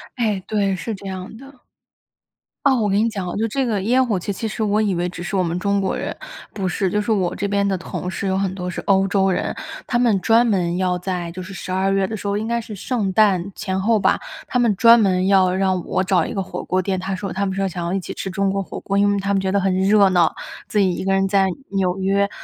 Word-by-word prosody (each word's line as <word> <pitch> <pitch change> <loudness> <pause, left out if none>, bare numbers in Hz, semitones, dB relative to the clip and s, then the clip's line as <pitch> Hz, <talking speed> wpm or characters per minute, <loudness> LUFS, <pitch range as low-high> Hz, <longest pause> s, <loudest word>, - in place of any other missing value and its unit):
哎， 220 -6 0
对， 200 -3 0
是 220 +5 -4
这 195 0 -9
样 190 +2 -6
的。 270 0 -15 1.0
哦， 275 -1 +5
我 220 -4 +1
跟 200 0 +2
你 225 +2 +2
讲 195 -5 -4
啊， 175 - -4
就 225 +2 +1
这 265 +4 -1
个 215 -5 -1
烟 250 +6 +3
火 210 -6 0
气 190 - -4
其 210 +3 -3
实 220 - -5
我 210 0 +2
以 210 -3 +1
为 175 0 -1
只 175 -1 -7
是 175 - -3
我 190 - +3
们 170 -1 -1
中 200 +2 0
国 190 - -1
人 - - -4 0.4
不 190 -3 -2
是， 185 +1 -1
就 210 - +1
是 210 - -2
我 185 -4 +1
这 200 - -2
边 200 0 +1
的 195 - +1
同 180 0 -5
事， 195 - -3
有 190 0 +1
很 195 -1 -1
多 180 -1 -4
是 - - -5
欧 195 -1 +2
洲 195 0 +2
人。 - - -2 0.3
他 240 - +1
们 235 -5 +3
专 230 +3 +4
门 180 -6 0
要 180 -1 +1
在 180 -2 -3
就 185 +2 -7
是 190 +1 -8
十 185 - -6
二 190 +1 +1
月 195 0 +2
的 220 - -4
时 205 - -6
候， 200 0 0
应 215 - -3
该 235 0 0
是 220 -1 -8
圣 205 -1 -2
诞 195 -3 +3
前 190 -2 -2
后 220 +2 +3
吧， - - +2 0.3
他 250 - 0
们 235 -4 +3
专 230 +4 +7
门 185 -3 +2
要 190 -2 +4
让 190 -2 0
我 - - 0
找 190 -1 +2
一 - - -5
个 195 - -1
火 - - -6
锅 185 - 0
店， 190 0 -1
他 190 +1 -3
说 190 -1 -5
他 200 +2 -1
们 190 - -3
说 195 0 0
想 175 -1 -5
要 170 - -2
一 195 - 0
起 180 - -7
吃 195 - -5
中 195 +1 0
国 195 0 -1
火 190 - -7
锅， 195 - -3
因 205 0 +4
为 200 - +1
他 200 +1 -1
们 195 - +2
觉 190 0 -1
得 200 - +2
很 190 -1 +1
热 195 +1 +4
闹。 175 -3 +3 0.3
自 - - -3
己 190 -3 +3
1 - - -4
个 195 - 0
人 195 0 +2
在 195 0 +3 0.2
纽 190 -2 0
约， 195 +1 +1
195 Hz, 300 characters per minute, -21 LUFS, 185-210 Hz, 1.0 s, 专